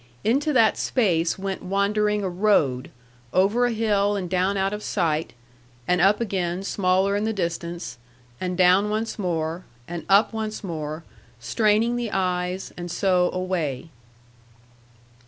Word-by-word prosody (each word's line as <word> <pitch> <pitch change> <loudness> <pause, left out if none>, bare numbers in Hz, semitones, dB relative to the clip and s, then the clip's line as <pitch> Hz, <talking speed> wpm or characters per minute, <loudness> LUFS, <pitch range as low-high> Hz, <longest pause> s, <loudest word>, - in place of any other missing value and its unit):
Into 275 +7 +1
that 225 -4 +4
space 170 -9 +1
went 195 0 -4
wandering 205 +2 0
a - - 0
road, 175 -9 +1 0.4
over 205 +7 +3
a - - -1
hill 205 -2 +1
and 190 -3 -3
down 185 +2 0
out 195 +1 0
of 210 - -4
sight, 160 -5 -1 0.5
and 180 0 +2
up 200 +3 +4
again 190 -5 -2
smaller 195 0 +1
in 205 - 0
the 220 - 0
distance, 170 - -4 0.4
and 180 -1 -3
down 185 +3 +4
once 220 +1 -3
more, 170 -2 -2 0.2
and 175 0 -5
up 200 +4 +4
once 220 -1 -4
more, 155 -3 -5 0.4
straining 220 - +1
the 240 -2 -2
eyes, 180 0 -2
and 175 0 -6
so 180 0 +2
away. 170 -6 -3
190 Hz, 140 wpm, -24 LUFS, 175-210 Hz, 0.5 s, that